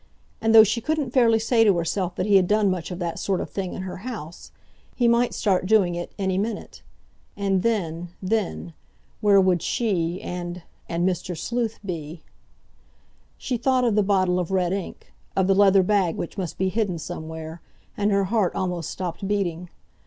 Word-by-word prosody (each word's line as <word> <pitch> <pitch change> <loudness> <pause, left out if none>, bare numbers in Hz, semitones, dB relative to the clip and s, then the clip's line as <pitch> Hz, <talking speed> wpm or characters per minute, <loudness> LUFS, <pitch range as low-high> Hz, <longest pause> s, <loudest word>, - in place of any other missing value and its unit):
And, 225 0 +3
though 220 - +11
she 225 +3 0
couldn't 300 -1 -1
fairly 235 -4 +4
say 225 +1 +3
to 200 -5 +4
herself 175 +2 -2
that 185 - -1
he 205 -1 +3
had 185 -2 +3
done 210 -1 +3
much 180 -3 -3
of 180 - -5
that 170 -2 -3
sort 195 -2 -1
of - - -5
thing 190 -2 -4
in 185 - -5
her 185 - -6
house, 190 -7 -8 0.4
he 240 - +2
might 235 +1 +3
start 185 -4 0
doing 200 -4 +4
it 175 0 -5
any 190 -2 0
minute. 215 +1 -4 0.6
And 195 -2 +1
then—then—where 180 - -1
would 185 -3 +3
she, 180 -6 -1
and—and 175 0 -4
Mr. 180 -1 -2
Sleuth, 230 +5 -2
be? 160 -3 -6 1.1
She 250 - -2
thought 255 +2 +2
of 235 -3 +2
the 210 - +3
bottle 185 -3 +2
of 175 - -2
red 185 -2 +1
ink—of 195 0 -4
the 195 - +4
leather 195 -1 +5
bag 190 -3 +1
which 170 - -5
must 185 -5 -4
be 190 0 +1
hidden 200 -3 -1
somewhere—and 160 +5 -6
her 200 -1 +2
heart 200 -1 0
almost 180 -4 -2
stopped 185 +2 -4
beating. 180 -4 -2
190 Hz, 170 wpm, -24 LUFS, 175-215 Hz, 1.1 s, though